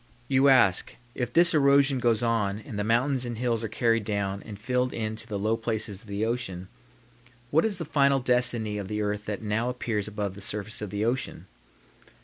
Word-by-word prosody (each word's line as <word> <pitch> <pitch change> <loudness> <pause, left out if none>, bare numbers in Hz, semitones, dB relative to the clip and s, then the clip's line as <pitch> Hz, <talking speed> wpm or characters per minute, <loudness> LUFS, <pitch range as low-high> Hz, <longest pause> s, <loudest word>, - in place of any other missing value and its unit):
You 135 +1 +4
ask, 115 -9 +4 0.2
If 125 -2 -3
this 170 +3 +5
erosion 140 -2 +4
goes 120 -2 +1
on 110 -4 +1
and 105 -1 -7
the - - 0
mountains 125 +4 +1
and 120 -2 -5
hills 115 -1 -1
are - - -1
carried 115 0 +1
down 100 -1 -2
and 105 -3 -9
filled 125 +4 -1
in 110 -1 -3
to 115 - -5
the 105 -3 -3
low 110 +3 +1
places 110 -3 -3
of 115 - -17
the 100 +2 -2
ocean, 110 -6 -3 0.8
what 160 +6 +4
is 210 -4 0
the 165 - -4
final 140 -2 +3
destiny 120 -4 +1
of 100 - -5
the 105 +1 -2
earth 105 0 -2
that 105 0 -4
now 110 +3 0
appears 115 -4 -2
above 105 -2 -3
the 100 - -11
surface 105 +2 -3
of 105 - -4
the 105 +2 -2
ocean? 125 +3 -2
115 Hz, 205 wpm, -27 LUFS, 105-125 Hz, 0.8 s, this